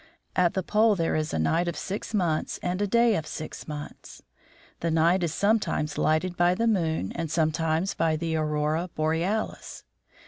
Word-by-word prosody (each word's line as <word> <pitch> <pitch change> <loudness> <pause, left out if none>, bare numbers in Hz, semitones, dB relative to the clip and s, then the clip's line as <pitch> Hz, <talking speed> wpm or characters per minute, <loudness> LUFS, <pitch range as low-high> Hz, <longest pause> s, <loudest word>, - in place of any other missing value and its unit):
At 175 -2 +2
the 190 - 0
pole 215 +3 +3
there 165 -3 0
is 155 0 -1
a - - -1
night 165 - +1
of 170 - -2
six 200 +4 -5
months 175 -7 0
and 180 +2 -1
a 205 - +1
day 235 +1 +4
of 155 -3 -3
six 155 - -7
months. 150 -1 -8 0.6
The 170 - -1
night 165 +3 +3
is 170 -3 0
sometimes 200 -6 0
lighted 165 +3 +1
by 175 +1 +3
the 230 - 0
moon 165 - 0
and 165 -1 -3
sometimes 160 +2 0
by 160 -1 +1
the 160 +1 -2
aurora 155 +2 0
borealis. 165 +8 -2
165 Hz, 175 wpm, -26 LUFS, 155-190 Hz, 0.6 s, day